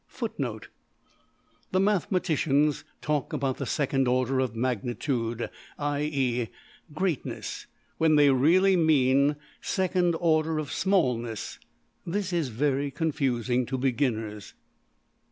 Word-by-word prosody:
\footnote - - -4 1.0
{The 185 - +2
mathematicians 165 -7 +1 0.2
talk 150 +1 -1
about 135 -3 -1
the - - -4
second 135 -3 +1
order 130 +1 +1
of 130 -4 -1
``magnitude'' 120 0 -2 0.3
(\IE~greatness) 145 +3 -3 0.3
when 160 -1 +4
they 145 -1 +6
really 175 +9 +4
mean 145 -3 +3 0.3
second 180 -2 +1
order 160 -2 +2
of 150 -2 -3
\emph{smallness}. 125 - 0 0.4
This 185 +1 -2
is 165 -5 +1
very 140 +4 0
confusing 130 -5 0
to 130 +2 -2
beginners. 115 -5 -1
140 Hz, 100 wpm, -27 LUFS, 125-160 Hz, 1.0 s, they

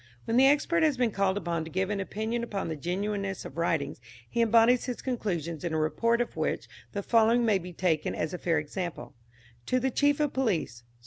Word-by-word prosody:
When 225 - -1
the 265 +2 +7
expert 295 +4 +3
has 305 -4 +3
been 245 -3 +2
called 195 -1 +1
upon 170 -4 -2
to 160 - -8
give 190 +4 -1
an 205 - -1
opinion 220 +4 -2
upon 200 -7 -3
the 160 - -2
genuineness 195 +4 -3
of - - -9
writings 160 -7 -1 0.3
he 235 - -1
embodies 230 +2 +4
his 250 -2 -4
conclusions 175 - -3
in 170 -2 -2
a - - +1
report 230 +10 +1
of 240 - -3
which - - -2 0.2
the 200 - -4
following 230 +2 +4
may 210 -4 +3
be 180 0 -8
taken 165 -3 0
as 155 +2 -2
a 180 - -4
fair 165 -2 +1
example: 165 +4 -4 0.5
To 255 - +2
the 265 +1 0
Chief 285 +3 +2
of 295 -2 +1
Police. 190 - -1
200 Hz, 210 wpm, -28 LUFS, 170-240 Hz, 0.5 s, the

